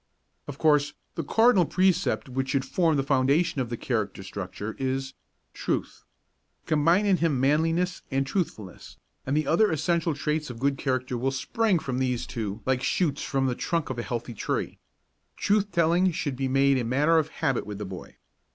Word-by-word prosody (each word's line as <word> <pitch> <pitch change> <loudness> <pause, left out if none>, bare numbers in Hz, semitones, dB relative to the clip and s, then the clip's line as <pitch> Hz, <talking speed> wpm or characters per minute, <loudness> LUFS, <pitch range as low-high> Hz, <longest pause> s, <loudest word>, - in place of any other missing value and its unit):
Of 145 -2 -7
course, 150 -2 +3 0.2
the 165 - -3
cardinal 225 - +4
precept 185 -3 +1
which 130 +1 -3
should 135 -1 0
form 160 +2 +1
the 135 - +1
foundation 140 +3 +2
of 120 - -3
the 120 - -3
character 105 -6 -2
structure 100 +3 -6
is 135 0 -2 0.4
Truth. - - -3 0.6
Combine 165 +6 +3
in 195 -2 +3
him 160 -6 +1
manliness 165 +6 +1
and 135 0 0
truthfulness, 135 - -4 0.3
and 140 +3 +1
the 155 - +1
other 210 +6 +3
essential 165 +1 0
traits 150 +1 -2
of 120 - -7
good 135 +2 0
character 130 -2 -1
will 130 +2 +1
spring 195 +9 +1
from 130 -5 -3
these 125 -2 -1
two 110 -2 -5
like 130 -1 +1
shoots 145 -1 0
from 135 -1 0
the 130 - +1
trunk 165 +2 -2
of 125 - -4
a - - 0
healthy 120 0 -4
tree. 105 - -3 0.6
Truth 205 0 +1
telling 170 +2 +3
should 150 -5 -3
be 135 +1 -1
made 135 0 +3
a - - -1
matter 145 +8 +3
of 155 - -1
habit 135 -8 -1
with 105 -1 -5
the 105 - -5
boy. 95 -1 -9
140 Hz, 180 wpm, -26 LUFS, 130-165 Hz, 0.6 s, cardinal